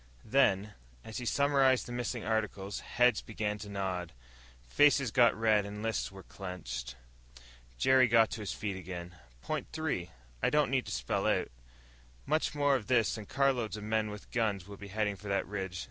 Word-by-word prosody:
Then, 105 Hz, -4 st, +2 dB, 0.3 s
as 110 Hz, -, -6 dB
he 125 Hz, -, -5 dB
summarized 135 Hz, -1 st, +3 dB
the -, -, -8 dB
missing 120 Hz, -1 st, -3 dB
articles, 110 Hz, -3 st, -2 dB
heads 125 Hz, -3 st, +2 dB
began 105 Hz, -1 st, -3 dB
to 105 Hz, 0 st, -8 dB
nod. 95 Hz, -4 st, -3 dB, 0.5 s
Faces 140 Hz, -, +4 dB
got 120 Hz, -3 st, +4 dB
red 110 Hz, -2 st, +4 dB
and 105 Hz, +1 st, -7 dB
lists 115 Hz, -3 st, -1 dB
were 95 Hz, -1 st, -11 dB
clenched. 85 Hz, -11 st, -6 dB, 0.8 s
Jerry 130 Hz, -, +5 dB
got 115 Hz, -1 st, +4 dB
to 110 Hz, -, -4 dB
his 105 Hz, -, -3 dB
feet 100 Hz, -2 st, -3 dB
again. 90 Hz, -1 st, -7 dB, 0.3 s
"Point -, -, -3 dB
three, 145 Hz, -, -2 dB, 0.3 s
I -, -, +3 dB
don't 150 Hz, -3 st, +2 dB
need 130 Hz, -2 st, +1 dB
to -, -, -5 dB
spell -, -, -1 dB
out. -, -, +1 dB, 0.8 s
Much 155 Hz, 0 st, 0 dB
more 145 Hz, -1 st, +3 dB
of 115 Hz, -6 st, -3 dB
this 115 Hz, -6 st, +3 dB
and 110 Hz, -3 st, -8 dB
carloads 130 Hz, -6 st, +1 dB
of 105 Hz, -, -7 dB
men 110 Hz, 0 st, 0 dB
with 105 Hz, -1 st, -10 dB
guns 105 Hz, -6 st, 0 dB
will 100 Hz, -1 st, -9 dB
be 100 Hz, -, -9 dB
heading 105 Hz, 0 st, -1 dB
for 105 Hz, -, -10 dB
the 100 Hz, 0 st, 0 dB
ridge. 95 Hz, -3 st, -4 dB
110 Hz, 180 wpm, -32 LUFS, 100-125 Hz, 0.8 s, Jerry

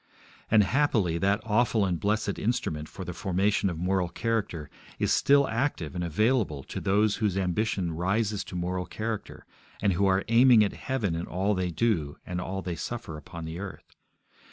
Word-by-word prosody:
And, 110 Hz, -1 st, +6 dB
happily, 105 Hz, -, +1 dB
that 100 Hz, +2 st, +2 dB
awful 110 Hz, -1 st, +2 dB
and 90 Hz, -3 st, -1 dB
blessed 105 Hz, 0 st, 0 dB
instrument 80 Hz, -9 st, -2 dB
for 95 Hz, -, -8 dB
the 90 Hz, -, -5 dB
formation 100 Hz, +1 st, +1 dB
of 85 Hz, -, -4 dB
moral 90 Hz, +1 st, 0 dB
character 105 Hz, -9 st, -2 dB, 0.3 s
is -, -, +1 dB
still 140 Hz, 0 st, +4 dB
active 110 Hz, -, -1 dB
and 90 Hz, -1 st, -3 dB
available 95 Hz, -, +1 dB
to -, -, -6 dB
those 105 Hz, +2 st, +2 dB
whose 105 Hz, -4 st, 0 dB
ambition 95 Hz, -1 st, 0 dB
rises 100 Hz, +5 st, 0 dB
to -, -, -8 dB
moral 90 Hz, +1 st, -2 dB
character, 110 Hz, -1 st, -5 dB, 0.3 s
and 100 Hz, -1 st, +2 dB
who 100 Hz, +3 st, +2 dB
are 95 Hz, 0 st, +2 dB
aiming 115 Hz, 0 st, +6 dB
at 100 Hz, -, -1 dB
heaven 115 Hz, -9 st, -2 dB
in 85 Hz, +1 st, -3 dB
all 95 Hz, +5 st, 0 dB
they 90 Hz, -2 st, -1 dB
do 85 Hz, -7 st, 0 dB
and 90 Hz, 0 st, -3 dB
all 95 Hz, +1 st, -4 dB
they 90 Hz, -1 st, -3 dB
suffer 115 Hz, -3 st, -5 dB
upon 80 Hz, +2 st, -8 dB
the 80 Hz, +2 st, -6 dB
earth. 100 Hz, -1 st, -9 dB
95 Hz, 180 wpm, -28 LUFS, 90-110 Hz, 0.3 s, And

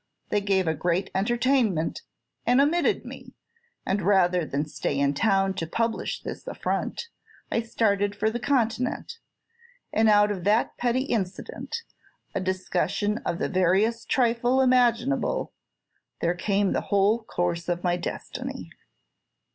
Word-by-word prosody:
They 205 Hz, -, +1 dB
gave 195 Hz, -2 st, +1 dB
a 160 Hz, -, +2 dB
great 170 Hz, +4 st, -1 dB
entertainment, 230 Hz, -, +1 dB, 0.4 s
and 250 Hz, +2 st, +3 dB
omitted 310 Hz, +5 st, +2 dB
me; -, -, -10 dB, 0.5 s
and 195 Hz, +1 st, 0 dB
rather 180 Hz, -2 st, +3 dB
than 145 Hz, +2 st, -1 dB
stay 145 Hz, -1 st, -3 dB
in 140 Hz, 0 st, +2 dB
town 195 Hz, +2 st, +2 dB
to 170 Hz, -4 st, -4 dB
publish 230 Hz, +6 st, -2 dB
this -, -, -7 dB
affront, 470 Hz, -, -3 dB, 0.4 s
I 230 Hz, -, +1 dB
started 205 Hz, -3 st, 0 dB
for 215 Hz, +2 st, 0 dB
the 240 Hz, -, -3 dB
Continent; 250 Hz, -, -1 dB, 0.7 s
and 220 Hz, 0 st, +4 dB
out 205 Hz, 0 st, +5 dB
of 190 Hz, -4 st, -4 dB
that 210 Hz, +5 st, +2 dB
petty 245 Hz, +1 st, 0 dB
incident, 225 Hz, -, -4 dB, 0.5 s
a -, -, -1 dB
discussion 185 Hz, +3 st, -1 dB
of 170 Hz, -, -1 dB
the -, -, -1 dB
veriest 195 Hz, +5 st, +1 dB
trifle 240 Hz, +1 st, +2 dB
imaginable, 255 Hz, -, +2 dB, 0.7 s
there 170 Hz, -, +1 dB
came 195 Hz, +2 st, 0 dB
the -, -, 0 dB
whole 205 Hz, +3 st, +3 dB
course 175 Hz, -4 st, -2 dB
of 175 Hz, 0 st, -1 dB
my 175 Hz, -1 st, +2 dB
destiny." 175 Hz, -, -6 dB
205 Hz, 135 wpm, -26 LUFS, 180-235 Hz, 0.7 s, out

